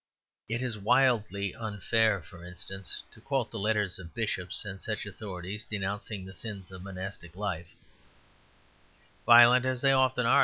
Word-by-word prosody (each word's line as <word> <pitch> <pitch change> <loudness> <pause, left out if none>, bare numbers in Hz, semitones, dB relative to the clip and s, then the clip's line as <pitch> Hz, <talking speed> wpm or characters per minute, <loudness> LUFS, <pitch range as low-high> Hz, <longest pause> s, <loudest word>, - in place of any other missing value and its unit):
It 120 +2 -1
is 120 -4 -3
wildly 105 -4 +2
unfair, 110 -2 +1
for 85 0 -13
instance, 95 +2 -6
to - - -17
quote 135 -4 -1
the 115 - -4
letters 105 -3 +1
of 85 -4 -11
bishops - - -2
and 95 -1 -6
such 110 -2 -3
authorities 100 0 -6
denouncing 100 -1 -4
the 95 - -10
sins 100 -4 -6
of 95 -1 -9
monastic 95 -2 -6
life, 90 -4 -4 1.5
violent 120 +1 +9
as 130 -1 0
they 135 - +5
often 130 -2 +3
are. - - +6
105 Hz, 150 wpm, -30 LUFS, 95-115 Hz, 1.5 s, violent